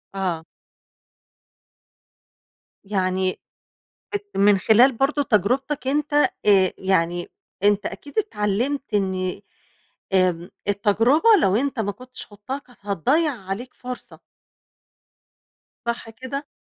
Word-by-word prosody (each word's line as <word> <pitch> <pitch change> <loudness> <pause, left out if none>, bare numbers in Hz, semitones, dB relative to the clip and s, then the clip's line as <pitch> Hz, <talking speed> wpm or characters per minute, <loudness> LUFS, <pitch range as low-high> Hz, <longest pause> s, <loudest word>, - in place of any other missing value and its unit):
آه. 175 -4 -2 2.4
يعني 185 -2 -1 0.8
أت 410 0 -4
من 200 0 +5
خلال 230 +7 +5
برضو 275 +4 +1
تجربتك 255 +5 0
أنت 295 +1 0 0.3
آآ، 195 -3 +5
يعني 175 -2 0 0.3
أنت 205 0 +3
أكيد 285 - -7
اتعلمت 250 - 0
إن 190 -2 -1 0.7
آمم، 180 -2 +2 0.2
التجربة 225 - +3
لو 190 +1 +3
أنت 265 0 -1
ما 205 -2 -1
كنتش 255 +4 -11
خُضتها 210 +6 -6
كانت 250 -4 -21
هتضيّع 265 - +1
عليك 205 +4 -6
فرصة. 250 0 -9 1.7
صح 235 -1 -3
كده؟ 260 +5 -6
210 Hz, 100 wpm, -23 LUFS, 195-265 Hz, 2.4 s, من